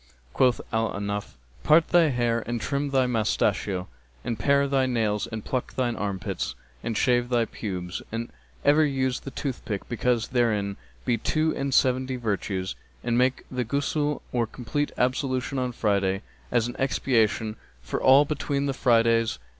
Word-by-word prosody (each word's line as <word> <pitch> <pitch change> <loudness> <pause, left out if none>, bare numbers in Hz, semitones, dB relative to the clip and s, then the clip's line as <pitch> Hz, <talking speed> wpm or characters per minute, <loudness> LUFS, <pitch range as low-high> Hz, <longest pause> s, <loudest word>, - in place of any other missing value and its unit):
Quoth 125 -2 +3
Al 110 0 +1
Ahnaf, 100 0 -4 0.3
'Part 155 +2 +5
thy 170 -3 +5
hair 120 -3 +1
and 120 0 -1
trim 140 +4 -1
thy 135 -2 +3
moustachio 105 -5 0 0.4
and 115 -3 -3
pare 140 +4 +3
thy 135 -1 +2
nails 110 -4 0
and 110 -1 -6
pluck 130 -2 -3
thine 120 -2 0
armpits 100 -2 -3 0.3
and 115 -2 -2
shave 120 -1 +2
thy 120 -2 +2
pubes[FN#268] 90 -5 -5
and 115 +1 -3 0.4
ever 150 +2 +6
use 130 -3 0
the - - -7
toothstick 125 -7 -4
because 120 -1 0
therein 105 -5 +1 0.3
be 120 -2 +1
two 155 +6 +1
and 135 0 -2
seventy 130 0 +2
virtues, 100 -5 -2 0.3
and 120 -1 0
make 125 +2 +2
the 125 -1 -1
Ghusl 145 +4 -1
or 120 -2 +1
complete 140 +6 -3
ablution 130 +1 0
on 125 -1 -1
Friday, 100 -3 0 0.3
as 120 -1 +2
an 120 - -6
expiation 115 -5 +1 0.3
for - - -3
all 135 +3 +7
between 140 -1 -1
the 140 - 0
Fridays.' 115 -2 +3
120 Hz, 155 wpm, -26 LUFS, 110-135 Hz, 0.4 s, all